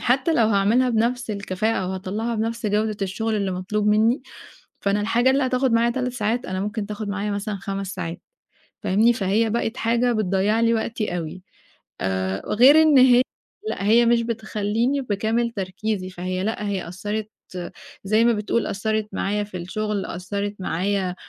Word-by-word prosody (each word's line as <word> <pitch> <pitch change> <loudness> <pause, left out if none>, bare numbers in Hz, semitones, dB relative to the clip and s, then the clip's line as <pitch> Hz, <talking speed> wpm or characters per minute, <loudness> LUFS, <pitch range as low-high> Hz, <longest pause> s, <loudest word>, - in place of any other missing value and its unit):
حتّى 265 +6 +2
لو 225 -2 +4
هاعملها 215 +5 +3
بنَفْس 235 +1 0
الكفاءة 200 +1 -1
أو - - -3
هاطلَّعها 205 +5 -3
بنَفْس 225 +1 -2
جودة 210 +1 0
الشُغل 220 +4 -1
اللي 200 -2 -1
مطلوب 195 +3 -2
منّي، 220 +5 +3 0.6
فأنا 200 +1 +1
الحاجة 240 +4 +3
اللي 275 +1 +2
هتاخُد 255 -1 +1
معايا 230 +1 +3
3 250 0 -2
ساعات، 235 +1 -1
أنا 185 0 -3
ممكن 210 0 -3
تاخُد 210 0 -5
معايا 205 +1 -2
مثلًا 205 0 -3
5 195 0 -4
ساعات، 170 -2 -5 0.6
فاهمني؟ 220 +5 +4
فهي 215 +1 +1
بقت 235 +2 -1
حاجة 235 +2 +1
بتضيّع 210 +1 +1
لي 230 0 +3
وقتي 220 -4 -2
أوي. 170 +2 -6 0.6
آآ 95 0 -1
غير 275 +8 +7
إن 300 -4 +6 0.2
ه 250 - +6 0.5
لأ، - - -3
هي 235 +3 +5
مش 235 0 +4
بتخلّيني 225 +3 -1
بكامل 230 +1 0
تركيزي، 195 -1 -3
فهي 185 +1 -3
لأ، 210 -1 -2
هي 190 -4 -3
أثّرِت، 210 +4 -4 0.8
زي 215 +3 +3
ما 235 - +4
بتقول 215 +2 -1
أثّرِت 215 +1 -1
معايا 205 +2 -1
في 205 -3 -7
الشُغل، 205 +3 -3
أثّرِت 200 +3 -4
معايا 185 +1 -1
215 Hz, 165 wpm, -23 LUFS, 195-230 Hz, 0.8 s, غير